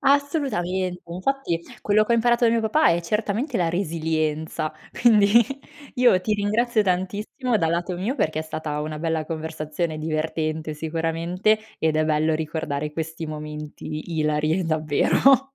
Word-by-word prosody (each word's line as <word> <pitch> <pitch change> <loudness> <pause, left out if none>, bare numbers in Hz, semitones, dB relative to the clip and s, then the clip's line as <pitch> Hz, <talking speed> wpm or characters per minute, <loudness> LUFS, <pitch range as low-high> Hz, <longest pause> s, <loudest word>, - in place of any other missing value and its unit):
Assolutamente! 265 - 0
Infatti 180 +1 -1 0.2
quello 210 +1 +3
che 235 - 0
ho - - +5
imparato 240 +1 +3
da 230 - +5
mio 230 - +2
papà 300 +8 +3
è 170 - +2
certamente 215 - -1
la 175 -3 +1
resilienza. 160 -2 -1 0.2
Quindi 215 -4 +5 0.7
io 245 -8 +5
ti 215 +3 0
ringrazio 215 +3 +1
tantissimo, 205 +6 -1
dal 165 -4 +1
lato 175 +2 -1
mio, 200 +9 -1
perché 155 - 0
è - - -1
stata 155 -1 -4
una 155 0 -4
bella 160 -1 -1
conversazione 155 0 -3
divertente 155 0 -2
sicuramente, 165 +6 0 0.2
ed 160 -1 +2
è 155 - +3
bello 155 +1 +2
ricordare 150 -2 -3
questi 160 +1 -4
momenti 150 +1 -6
ilari, 155 +3 +1
davvero. 165 - +3
165 Hz, 145 wpm, -24 LUFS, 155-210 Hz, 0.7 s, ho